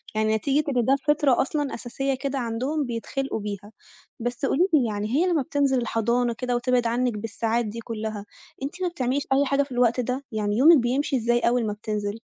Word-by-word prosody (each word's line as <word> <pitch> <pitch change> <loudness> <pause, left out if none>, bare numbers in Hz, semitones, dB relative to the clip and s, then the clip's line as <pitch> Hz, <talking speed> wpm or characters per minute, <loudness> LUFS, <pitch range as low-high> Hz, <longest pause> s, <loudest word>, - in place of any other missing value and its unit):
يعني 215 0 +2
نتيجة 280 +6 +1
إن 240 - +2
ده 270 - +4
فطرة 295 -4 +3
أصلًا 290 0 -2
أساسية 270 +3 -2
كده 275 +1 -3
عندهم 255 +6 -2
بيتخلقوا 245 +2 -3
بيها. 205 0 -6 0.5
بس 245 +3 -2
قولي 340 +7 +2
لي 280 -6 +5
يعني 205 0 -2
هي 330 +5 +3
لمّا 340 -5 +2
بتنزل 280 -2 +1
الحضانة 235 +1 0
كده 245 +1 -2
وتبعد 245 0 +1
عنِك 245 +1 0
بالساعات 225 +2 -1
دي 215 +2 -5
كلّها، 220 -2 -5 0.4
أنتِ 320 +7 -5
ما 365 - +1
بتعمليش 275 -4 -1
أي 280 +1 +3
حاجة 280 +1 +2
في 275 - -13
الوقت 245 -1 +2
ده؟ 250 +3 -2
يعني 210 -1 -1
يومِك 315 +6 +8
بيمشي 265 +3 0
إزاي 240 0 +2
أوّل 240 0 +1
ما 210 - -1
بتنزل؟ 210 0 -4
245 Hz, 195 wpm, -25 LUFS, 225-275 Hz, 0.5 s, يومِك